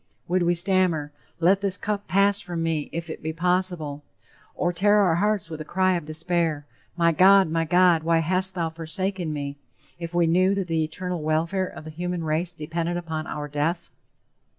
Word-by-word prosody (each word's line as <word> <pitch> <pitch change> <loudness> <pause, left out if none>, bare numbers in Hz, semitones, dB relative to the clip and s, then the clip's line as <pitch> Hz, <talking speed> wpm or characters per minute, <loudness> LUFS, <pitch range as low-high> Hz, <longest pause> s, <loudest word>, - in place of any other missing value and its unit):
Would 180 +1 +1
we 175 0 +2
stammer, 175 -5 +1 0.3
"Let 190 +4 +3
this 200 -2 0
cup 205 -1 -3
pass 200 +1 +3
from 170 -2 -4
me, 160 -2 -1
if 170 0 -4
it 160 - -7
be 160 - -3
possible," 175 -4 0 0.5
or 175 0 0
tear 205 +4 +3
our 185 -5 +3
hearts 205 -3 0
with 160 -1 -6
a - - -3
cry 185 +3 +1
of 170 -4 -3
despair: 160 -1 -1 0.3
"My 170 -1 +4
God, 190 +1 +5
my 165 0 0
God, 175 0 +4
why 165 +1 +2
hast 185 +3 +2
thou 165 -2 -1
forsaken 175 +2 -3
me," 145 -1 -5 0.4
if 170 0 -6
we 175 -1 +4
knew 185 +4 +3
that 195 -1 -1
the 165 -2 0
eternal 180 +2 -4
welfare 165 +5 0
of - - -10
the 155 - -8
human 175 +1 -4
race 160 +3 -1
depended 170 +2 -3
upon 160 -2 -4
our 150 0 -5
death? 150 +4 -2
170 Hz, 190 wpm, -24 LUFS, 160-185 Hz, 0.5 s, God